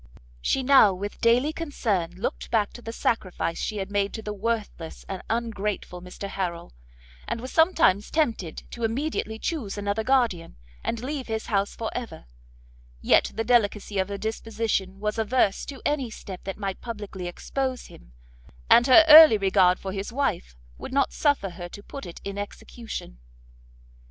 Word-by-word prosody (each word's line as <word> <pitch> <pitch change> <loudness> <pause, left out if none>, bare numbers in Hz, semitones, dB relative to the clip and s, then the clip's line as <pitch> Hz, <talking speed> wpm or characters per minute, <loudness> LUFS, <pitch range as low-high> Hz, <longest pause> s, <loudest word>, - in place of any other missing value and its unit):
She 265 - 0
now 255 -8 +6
with 200 +3 -6
daily 245 +6 +3
concern 225 - -1
looked 195 +6 -4
back 215 -3 +1
to 240 - -10
the 225 - -6
sacrifice 185 -7 -1
she 215 - -3
had 195 0 -4
made 200 0 0
to 220 - -6
the 210 - -4
worthless 210 -6 -4
and 190 -2 -5
ungrateful 210 -5 -3
Mr 180 +2 -7
Harrel, 175 - -4 0.5
and - - -3
was 255 +3 -7
sometimes 320 - +3
tempted 230 - -1
to 235 - -7
immediately 225 -1 -2
chuse 225 -7 -3
another 205 +2 -1
guardian, 230 - +1 0.3
and 230 - -2
leave 275 -1 -4
his 220 -1 -3
house 200 0 +1
for 225 - -4
ever; 240 - -6 0.7
yet - - +3
the 225 - -1
delicacy 210 -4 +1
of 190 +1 0
her 200 - -4
disposition 220 -3 -2
was 210 +2 -2
averse 220 -2 +1
to 275 -2 -8
any 285 -4 0
step 195 -4 -9
that 195 - -5
might 195 -2 -4
publicly 205 -6 -6
expose 260 +8 -3
him, - - -16 0.6
and 240 +2 +7
her 315 +5 +8
early 310 -6 +10
regard 190 -2 +3
for 190 - -6
his 195 +2 -5
wife 230 - -2 0.2
would - - -7
not 275 0 +2
suffer 285 - +1
her 175 0 -8
to 205 - -11
put 275 -3 -8
it 170 - -9
in 200 0 -5
execution. 205 - -7
215 Hz, 165 wpm, -25 LUFS, 195-245 Hz, 0.7 s, early